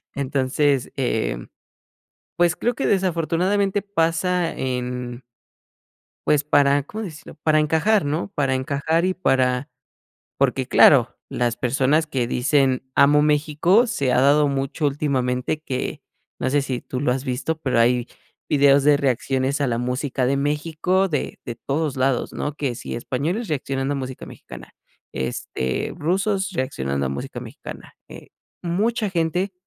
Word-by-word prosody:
entonces, 140 0 0
em, 110 - -1 0.9
pues 175 -2 +3
creo 240 - 0
que - - -1
desafortunadamente 190 +2 +1
pasa 175 -2 0
en 125 -1 -3 1.1
pues 150 -1 +3
para, 145 -1 +3
¿cómo 215 +9 -6
decirlo?, 155 -5 -10
para 155 -1 +3
encajar, 165 +7 +2
¿no?, 155 +7 -2
para 135 -2 +1
encajar 140 +6 0
y 185 - +1
para 130 -5 +1 0.7
porque - - +1
claro, - - +6
las 120 -1 -1
personas 135 +5 +1
que 130 -6 -2
dicen: 130 0 +1
"Amo 145 +1 +5
México", 155 +9 +3
se 140 - 0
ha 125 - +3
dado 145 +2 +4
mucho 140 +2 -1
últimamente 135 -1 -1
que 130 -5 -4 0.4
No - - 0
sé 145 +1 +2
si 130 -3 -3
tú 130 - -5
lo 145 - +1
has 130 +2 -1
visto, 140 +5 -2
pero 130 -6 +1
hay 120 +1 +3 0.4
videos 140 -1 +4
de 145 0 +6
reacciones 135 +1 0
a 140 - +2
la 115 -2 -1
música 125 +1 -1
de 135 +2 +1
México 160 +6 0
de 150 -5 -3
de 120 -2 -6
todos 145 0 -2
lados, 130 -1 0
¿no?, 145 - -3
que 135 -5 -3
si - - -6
españoles 150 - -2
reaccionando 135 -1 -2
a - - -2
música 130 -1 -6
mexicana, - - -12 0.4
este, 65 0 -3
rusos 195 +4 0
reaccionando 70 - -2
a - - -1
música 70 +1 -5
mexicana, - - -10
eh, - - -12 0.3
mucha 210 +5 0
gente 180 +3 -1
145 Hz, 145 wpm, -22 LUFS, 130-165 Hz, 1.1 s, claro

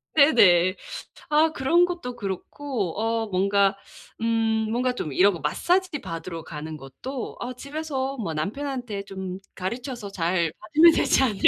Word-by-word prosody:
네네. 305 0 +6
네네. 180 0 +6 0.5
아 310 +2 +4
그런 335 +7 +4
것도 345 -9 -5
그렇고 205 - -4
어 225 0 0
뭔가 195 0 +2 0.4
음 225 -1 +1
뭔가 250 +1 +1
좀 150 - -4
이런 195 +6 +5
거 170 - -6
마사지 345 - 0
받으러 165 -3 -6
가는 155 0 -7
것도 240 - -7
'아 245 +1 -4
집에서 275 0 -4
뭐 185 -9 -3
남편한테 245 - -3
좀 190 -1 -6 0.2
가르쳐서 235 +3 -5
잘 170 -2 0
받으면 315 +10 +6
되지 265 - +3
않을까.' 215 -6 -1
220 Hz, 290 characters per minute, -25 LUFS, 185-270 Hz, 0.5 s, 네네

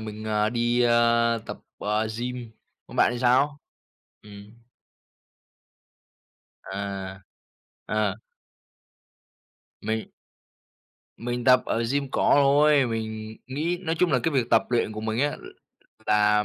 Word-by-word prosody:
mình, 110 0 -7
ờ, 105 0 +1
đi, 120 +1 +1
ơ, 115 0 +3
tập, - - -6 0.2
ờ, 105 +1 0
gym. 125 -1 -5 0.4
Còn - - -11
bạn 120 - +4
thì 120 - -4
sao? 130 +4 +2 0.6
Ừm. 100 0 -13 2.1
À, 95 -1 -6 0.7
ờ. 105 -2 0 1.7
Mình 110 0 -2 1.1
Mình 120 +1 -4
tập 125 0 +6
ở 115 - -1
gym 140 -1 -1
cỏ - - +2
thôi. 145 0 +5
Mình 110 -1 -5
nghĩ 155 +7 -2
nói 165 -2 -1
chung 180 -2 +2
là - - +4
cái 165 - -1
việc 125 -3 0
tập - - +5
luyện 120 -3 +1
của 110 - -6
mình 110 +1 -2
á, 145 +1 0
l - - -15 0.6
là 105 0 +3
115 Hz, 130 wpm, -25 LUFS, 110-130 Hz, 2.1 s, tập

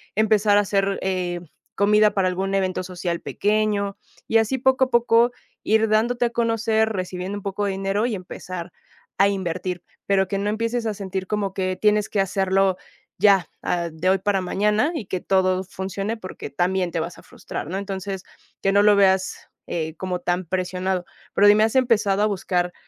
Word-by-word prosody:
empezar 215 -1 +3
a - - +4
hacer, 195 -1 0
eh, 180 -2 -2 0.3
comida 210 +1 +4
para 195 -3 +2
algún 190 +2 -2
evento 190 -1 0
social 175 -1 -4
pequeño. 205 -1 0 0.3
Y 225 - +3
así 225 +4 +1
poco 260 +1 +3
a - - -10
poco 235 0 +4 0.3
ir 220 +1 +3
dándote 235 +3 +2
a - - +1
conocer 225 -1 +1
recibiendo 185 -1 -4
un - - -7
poco 200 +1 -2
de 200 - 0
dinero, 195 +3 -1
y 245 - -1
empezar 180 -1 -7 0.5
a 195 - +5
invertir, 180 -2 -3 0.2
pero 195 -1 +2
que 195 +1 -2
no 205 +1 -1
empieces 230 +2 -1
a 220 - 0
sentir 190 -2 -5
como 205 -2 -2
que 185 -1 -1
tienes 210 0 +3
que 205 - -1
hacerlo 195 0 +2 0.4
ya, 195 -2 +4 0.2
ah, 170 -1 -1
de 160 +4 -1
hoy 190 - +4
para 195 0 0
mañana, 210 - +1
y 235 - -4
que 185 -1 -3
todo 185 -1 +2
funcione, 195 +4 -4
porque 185 -4 -8
también 180 0 0
te 165 - -2
vas 170 +2 -4
a - - -15
frustrar, - - -7
¿no? 185 +4 -3
Entonces, 195 -1 -5 0.4
que 195 - +2
no 205 - +5
lo 210 0 +6
veas, 190 -1 +2 0.2
eh, 160 -2 -3
como 185 -1 -3
tan 175 +1 -1
presionado. 185 +1 -2 0.3
Pero 205 - +5
dime, 210 +1 +6
¿has 220 +2 +1
empezado 220 -6 +3
a - - +4
buscar, 180 -3 -1
195 Hz, 185 wpm, -23 LUFS, 185-210 Hz, 0.5 s, lo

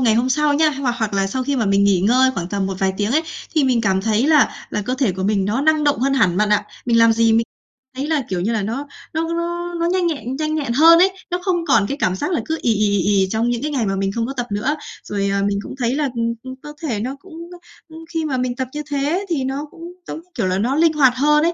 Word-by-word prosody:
ngày 230 -4 +3
hôm 245 +3 +1
sau 295 +2 +2
nha 310 +1 +3
hoặc 270 -4 -2
hoặc 220 -3 -1
là 195 0 +1
sau 255 +6 -2
khi 280 +1 -1
mà 225 -4 0
mình 200 0 +3
nghỉ 195 -3 +3
ngơi 255 +6 +4
khoảng 175 -1 -4
tầm 195 -1 -1
một 195 - -3
vài 190 -1 +1
tiếng 205 +2 -1
ấy 315 +2 +3 0.3
thì 300 -3 +3
mình 250 -3 +2
cảm 190 -3 +1
thấy 220 +4 +1
là 305 -2 +4 0.2
là 210 - -2
cơ 250 +5 -2
thể 260 -8 0
của 190 +1 -5
mình 200 -1 +1
nó 215 +7 0
năng 310 0 +2
động 290 - +2
hơn 275 +1 +1
hẳn 180 -9 +2
bạn 210 +1 +2
ạ. 210 0 +2 0.2
Mình 230 -1 +3
làm 230 0 +6
gì 225 0 +3
mình 230 +1 +3 0.5
thấy 275 +3 -3
là, 310 -3 +1
kiểu 180 -2 -2
như 220 +5 0
là, 220 -2 0
nó 250 +8 -4 0.3
nó 330 +1 -1
nó 345 +1 -3
nó 335 - 0
nhanh 360 0 +1
nhẹn 265 -5 -3
nhanh 310 +1 -2
nhẹn 275 -6 -2
hơn 330 +5 +7
ấy, 380 +1 +5 0.2
nó 355 - 0
không 350 -3 0
còn 205 -9 +3
cái 280 - -3
cảm 185 -7 0
giác 365 - -3
là 335 - 0
cứ 320 0 -2
ì, 230 - +2
ì, 210 0 +1
ì, - - +1 0.2
ì, 190 - +1
trong 225 +2 0
những 240 0 -1
cái 300 +1 -2
ngày 250 -6 0
mà 195 0 -1
mình 195 0 -1
không 230 +2 -2
có 270 - -4
tập 245 0 -2
nữa. 215 +9 0 0.3
Rồi, 200 -1 -2
à, 200 - 0
mình 200 0 -1
cũng - - -8
thấy 245 +1 0
là 290 -2 0
ừm, 230 0 0
ừ, 260 - -8
cơ 295 0 -9
thể 220 -5 -2
nó 255 +5 -3
cũng, 365 +1 -16 0.2
ơ, - - -10 0.3
ưm, 320 +1 -11
khi 325 -2 -2
mà 270 -4 -1
mình 250 -1 -1
tập 260 -1 -3
như 300 - -3
thế 290 +7 -1
thì 290 -6 0
nó 270 +3 -3
cũng, 335 - -15 0.3
giống - - -5
như 355 +3 -20
kiểu 220 -7 -1
là, 185 +1 0
nó 245 +7 0
linh 320 +1 +3
hoạt 265 -4 +4
hơn 300 +3 +3
ấy, 340 +1 +2
255 Hz, 305 wpm, -20 LUFS, 210-300 Hz, 0.5 s, hơn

